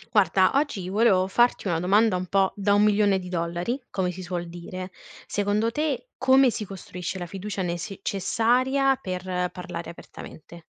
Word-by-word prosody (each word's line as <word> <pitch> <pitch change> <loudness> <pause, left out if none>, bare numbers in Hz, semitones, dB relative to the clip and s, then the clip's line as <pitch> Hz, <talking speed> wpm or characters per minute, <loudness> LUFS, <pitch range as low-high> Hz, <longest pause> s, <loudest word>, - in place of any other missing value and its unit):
Guarda, 190 -2 +4
oggi 275 -10 0
volevo 200 -2 +3
farti 240 +5 +2
una 170 -4 0
domanda 200 +4 +3
un 180 0 -3
po' 195 +1 +2
da 200 0 +2
1 205 - +4
milione 205 -2 +3
di 180 -1 -7
dollari 175 +9 -2
come 185 -2 -1
si 185 +1 -8
suol 175 -1 -4
dire, 185 +2 -7 0.3
secondo 205 +2 0
te 305 - -2
come 260 -1 +5
si 215 - -4
costruisce 185 -1 -6
la 175 - -4
fiducia 195 +2 -5
necessaria 225 +9 +1
per 180 -1 -3
parlare 180 -2 -7
apertamente? 170 0 -12
195 Hz, 155 wpm, -25 LUFS, 180-220 Hz, 0.3 s, come